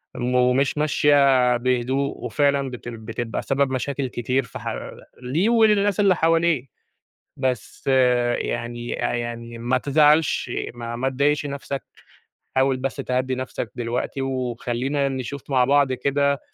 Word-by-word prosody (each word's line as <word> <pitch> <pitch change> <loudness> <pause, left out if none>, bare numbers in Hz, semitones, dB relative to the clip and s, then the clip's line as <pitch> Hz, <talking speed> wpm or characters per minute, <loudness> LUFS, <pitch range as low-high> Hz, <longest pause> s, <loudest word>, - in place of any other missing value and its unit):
م 125 +1 -1
ومش 125 +3 +2
ماشية 140 -4 +4
بهدوء، 130 +3 0
وفعلًا 140 -2 +1
بتل 120 -1 -7
بتبقى 115 +1 -4
سبب 135 -1 0
مشاكل 135 +1 -2
كتير 125 +2 -1
في 115 - -9
حَ - - -4 0.5
ليه 155 - +1
وللناس 210 -4 +3
اللي 195 -3 +4
حواليه. 165 -5 +2 0.7
بس 130 -2 -3 0.5
يعني 120 0 -3
أ - - -3
يعني 120 0 -5
ما 120 +2 0
تزعلش 150 -2 +3 0.2
ما 120 -1 -6
ما 130 +2 0
تضايقش 145 +3 +1
نَفْسك، 140 -1 -5 0.7
حاول 130 0 +3
بس 130 +1 -3
تهدّي 130 -1 -1
نَفْسك 130 0 -5
دلوقتي، 120 +3 -3
وخلّينا 130 +2 -1
نشوف 135 +1 -6
مع 130 -2 +3
بعض 140 -1 +3
كده 140 +2 +1
130 Hz, 130 wpm, -23 LUFS, 125-140 Hz, 0.7 s, ماشية